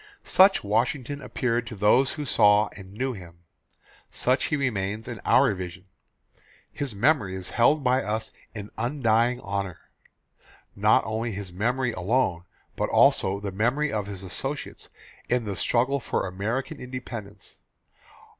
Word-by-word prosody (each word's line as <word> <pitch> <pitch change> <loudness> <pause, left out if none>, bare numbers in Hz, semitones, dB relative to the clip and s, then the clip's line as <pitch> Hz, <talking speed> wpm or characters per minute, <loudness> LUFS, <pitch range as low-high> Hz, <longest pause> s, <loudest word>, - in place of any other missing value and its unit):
Such 195 +1 +5
Washington 125 +6 -1
appeared 120 -4 -1
to 110 - -6
those 110 +7 +3
who 150 -1 -5
saw 105 -4 +4
and 95 -1 -12
knew 130 +3 -1
him. 85 -4 -12 0.7
Such 130 +1 +1
he - - 0
remains 110 -6 -2
to - - -7
our - - +5
vision. 90 -1 -7 0.9
His 135 -7 -4
memory 110 -4 +2
is 95 -1 -6
held 145 +5 +3
by 130 +1 +3
us 110 0 -3 0.2
in 105 -1 -7
undying 120 -1 +1
honour. 100 -4 -4 1.0
Not 105 +2 +4
only 110 +1 -2
his 95 -2 -7
memory 120 +6 0
alone 95 -4 0 0.3
but - - -1
also 95 +1 +4
the 100 -1 -4
memory 120 +9 0
of 105 -2 -2
his 100 -2 -7
associates 135 +10 -5 0.4
in 120 -2 +1
the 100 -2 -3
struggle 130 +7 +1
for - - -2
American 105 +8 -3
Independence. 115 -6 -8
110 Hz, 140 wpm, -26 LUFS, 100-130 Hz, 1.0 s, Such